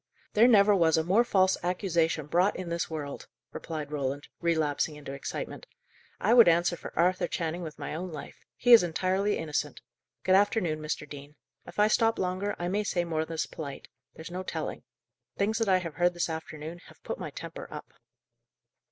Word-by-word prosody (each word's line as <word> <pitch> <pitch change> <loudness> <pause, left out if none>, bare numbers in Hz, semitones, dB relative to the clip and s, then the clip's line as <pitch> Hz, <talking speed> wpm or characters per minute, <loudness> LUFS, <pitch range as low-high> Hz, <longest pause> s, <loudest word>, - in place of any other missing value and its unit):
"There 225 +3 +6
never 210 -3 +6
was 165 -4 +4
a 160 - +2
more 195 +8 +4
false 190 -5 +3
accusation 170 -4 0
brought 175 +6 +2
in 185 -2 -5
this 170 0 -2
world," 150 -3 -6 0.3
replied 155 -3 -5
Roland, 140 -1 -3
relapsing 160 -2 0
into 145 -2 -8
excitement. 140 - -6 0.5
"I 220 - +3
would 235 -4 +8
answer 175 +1 +3
for - - -9
Arthur 180 +2 +2
Channing 170 0 -3
with 160 -3 -7
my - - -5
own 175 +3 -4
life. 150 - -9 0.2
He 245 0 +5
is 230 - +10
entirely 185 +4 0
innocent. 150 -2 -3 0.4
Good 185 - +3
afternoon, 190 -5 +2
Mr. 150 -1 -4
Dean. 145 +1 -10 0.3
If - - -11
I 210 0 +5
stop 225 +1 +2
longer, 185 +2 -1
I 175 - -3
may 205 +4 0
say 180 -4 0
more 160 -1 -1
than's 165 0 -2
polite; 140 -4 -8 0.3
there's 160 +2 -9
no 180 +1 -4
telling. 185 - -4 0.6
Things 215 +3 +1
that 225 -3 +1
I 185 - +5
have 170 -3 -5
heard 175 +2 +1
this 175 -1 -1
afternoon 160 +1 -6
have - - -18
put - - -5
my - - -4
temper - - -8
up." - - -9
175 Hz, 185 wpm, -29 LUFS, 155-190 Hz, 0.6 s, is